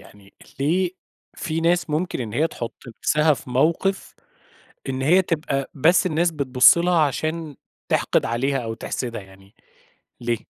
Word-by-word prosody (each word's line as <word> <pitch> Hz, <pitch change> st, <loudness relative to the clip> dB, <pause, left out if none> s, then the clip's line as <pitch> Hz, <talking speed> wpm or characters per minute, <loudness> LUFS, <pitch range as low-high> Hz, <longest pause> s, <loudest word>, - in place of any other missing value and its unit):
يعني 100 Hz, -1 st, -18 dB, 0.3 s
ليه 175 Hz, +6 st, +1 dB, 0.5 s
في 165 Hz, -2 st, -3 dB
ناس 170 Hz, 0 st, +1 dB
ممكن 155 Hz, 0 st, -2 dB
إن 110 Hz, -4 st, -5 dB
هي 150 Hz, +8 st, +2 dB
تحُط 120 Hz, -7 st, -6 dB
نفسها 150 Hz, +6 st, +2 dB
في 130 Hz, -, -11 dB
موقف 165 Hz, +9 st, 0 dB, 0.8 s
إن 130 Hz, 0 st, -3 dB
هي 170 Hz, +8 st, +5 dB
تبقى 150 Hz, -6 st, -2 dB
بس 165 Hz, +7 st, +3 dB
الناس 170 Hz, 0 st, +1 dB
بتبُص 135 Hz, -1 st, +5 dB
لها 175 Hz, 0 st, +2 dB
عشان 155 Hz, +1 st, -1 dB, 0.3 s
تِحْقِد -, -, +1 dB
عليها 125 Hz, +5 st, 0 dB
أو 115 Hz, -1 st, -4 dB
تحسدها 115 Hz, 0 st, -5 dB
يعني 95 Hz, +1 st, -18 dB, 0.7 s
ليه؟ 120 Hz, -1 st, 0 dB
150 Hz, 145 wpm, -22 LUFS, 120-165 Hz, 0.8 s, هي